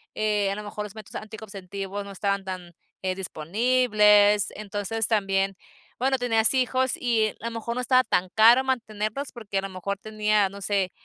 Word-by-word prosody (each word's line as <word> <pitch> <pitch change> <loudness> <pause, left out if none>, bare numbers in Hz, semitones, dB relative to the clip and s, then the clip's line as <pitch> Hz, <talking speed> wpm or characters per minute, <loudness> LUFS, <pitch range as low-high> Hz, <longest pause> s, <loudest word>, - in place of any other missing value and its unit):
eh, 210 -2 +1
a - - -2
lo 210 - -6
mejor 210 0 -5
los 210 0 -9
métodos 215 -2 -8
anticonceptivos 200 -2 -7
no 200 - -9
estaban 200 0 -1
tan, 185 -2 -7 0.3
eh, 185 -1 -1
disponibles. 210 +3 +3
Entonces, 210 +1 -2
también, 195 -3 +1 0.4
bueno, 265 +1 +2
tenías 230 -1 +2
hijos 260 0 +1
y 230 -3 +1
a 230 - -9
lo 235 - -2
mejor 230 +1 -4
no 250 - -1
estaba 255 0 +4
tan 180 -4 0
caro 235 +4 +7
mantenerlos, 235 0 -3
porque 220 -5 -5
a - - -3
lo 195 - -5
mejor 190 +2 -4
tenía, 210 -1 +1
no 200 +1 -11
sé, 195 -2 0
210 Hz, 180 wpm, -25 LUFS, 195-230 Hz, 0.4 s, caro